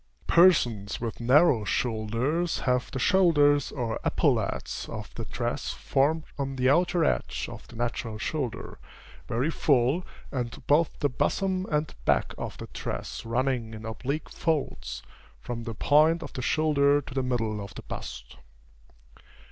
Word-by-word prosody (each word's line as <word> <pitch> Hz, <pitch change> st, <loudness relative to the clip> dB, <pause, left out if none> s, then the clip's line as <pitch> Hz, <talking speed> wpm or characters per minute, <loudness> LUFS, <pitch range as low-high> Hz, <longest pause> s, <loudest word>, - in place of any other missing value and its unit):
Persons 120 Hz, -, +4 dB
with 115 Hz, -2 st, -4 dB
narrow 125 Hz, 0 st, +5 dB
shoulders 120 Hz, +10 st, -1 dB
have 125 Hz, -1 st, +1 dB
the -, -, -5 dB
shoulders 145 Hz, -5 st, +4 dB
or 115 Hz, -4 st, -3 dB
epaulets -, -, 0 dB
of 105 Hz, 0 st, -7 dB
the 115 Hz, -, -5 dB
dress 120 Hz, +5 st, -3 dB
formed 150 Hz, +4 st, +1 dB, 0.2 s
on 135 Hz, -1 st, -2 dB
the 130 Hz, 0 st, +3 dB
outer 175 Hz, +1 st, +3 dB
edge -, -, -1 dB
of -, -, -10 dB
the -, -, -14 dB
natural 115 Hz, -1 st, -3 dB
shoulder, 135 Hz, 0 st, -4 dB, 0.5 s
very 125 Hz, +8 st, 0 dB
full, 140 Hz, +3 st, +2 dB, 0.3 s
and 125 Hz, -2 st, -4 dB
both 150 Hz, +4 st, +3 dB
the 145 Hz, -, +3 dB
bosom 185 Hz, +8 st, 0 dB
and 150 Hz, 0 st, 0 dB
back -, -, +2 dB
of -, -, -5 dB
the -, -, -7 dB
dress -, -, -5 dB
running 120 Hz, -2 st, -1 dB
in 110 Hz, +1 st, -9 dB
oblique 135 Hz, +7 st, -4 dB
folds, 160 Hz, -3 st, -2 dB, 0.4 s
from 115 Hz, -, -6 dB
the 115 Hz, -2 st, -5 dB
point 155 Hz, +7 st, +4 dB
of -, -, -8 dB
the 130 Hz, -, -4 dB
shoulder 145 Hz, 0 st, +3 dB
to 135 Hz, -, -10 dB
the 135 Hz, -, 0 dB
middle 115 Hz, -5 st, -1 dB
of 100 Hz, -, -10 dB
the -, -, -8 dB
bust. -, -, -8 dB
130 Hz, 150 wpm, -27 LUFS, 115-155 Hz, 0.5 s, narrow